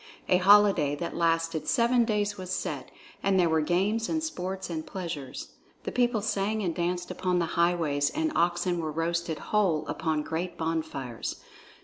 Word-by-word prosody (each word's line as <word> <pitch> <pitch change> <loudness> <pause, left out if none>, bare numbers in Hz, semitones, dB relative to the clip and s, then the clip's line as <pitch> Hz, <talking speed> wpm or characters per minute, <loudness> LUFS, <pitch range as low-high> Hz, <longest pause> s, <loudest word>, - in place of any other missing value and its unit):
A 180 - +5
holiday 190 -6 +5
that 170 +4 -5
lasted 165 -1 0
seven 240 -1 +3
days 210 -2 0
was 185 -2 -8
set, - - -3 0.3
and 195 -1 +2
there 175 - +4
were 160 -1 +2
games 200 +8 +1
and 315 -1 0
sports 190 - -4
and 160 -2 -4
pleasures. 160 -7 -6 0.3
The - - -3
people 240 -4 +1
sang 215 0 0
and 175 -3 0
danced 175 +1 -2
upon 180 -1 0
the 170 - +2
highways, 165 -5 +2
and 315 0 -1
oxen 175 +1 +1
were 160 -2 -2
roasted 165 0 -1
whole 190 -7 +1
upon 160 -2 -1
great 170 +3 -4
bonfires. 160 -7 -3
175 Hz, 160 wpm, -28 LUFS, 160-200 Hz, 0.3 s, A